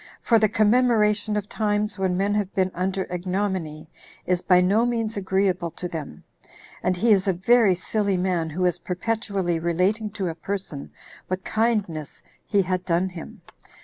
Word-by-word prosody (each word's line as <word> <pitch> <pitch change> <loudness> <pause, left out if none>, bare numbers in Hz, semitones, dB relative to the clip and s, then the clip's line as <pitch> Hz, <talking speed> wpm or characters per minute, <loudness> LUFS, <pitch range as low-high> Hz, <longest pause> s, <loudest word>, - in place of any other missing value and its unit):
For 230 -2 +3
the 215 -1 +3
commemoration 215 -1 +3
of 205 -1 -3
times 210 -1 -1
when 185 -2 0
men 200 +2 +1
have 205 -2 -1
been 190 -1 +1
under 190 +1 -1
ignominy, 180 -4 -3 0.4
is 180 -1 +1
by 180 -1 +4
no 195 +5 +3
means 230 -2 -1
agreeable 190 -3 0
to 180 - -3
them; 155 - -7 0.6
and 180 0 0
he 225 +5 +3
is 195 -2 +4
a 190 - +3
very 200 +2 +4
silly 200 +1 -1
man 180 -3 0
who 180 +4 -1
is 180 - +1
perpetually 190 -2 -2
relating 185 +6 0
to 190 -3 -1
a 165 - -2
person 175 -4 -5 0.4
what 185 0 -3
kindness 210 -9 -1 0.2
he 200 -2 +3
had 185 0 -2
done 180 +2 +1
him. 180 -3 -10
190 Hz, 165 wpm, -24 LUFS, 180-210 Hz, 0.6 s, by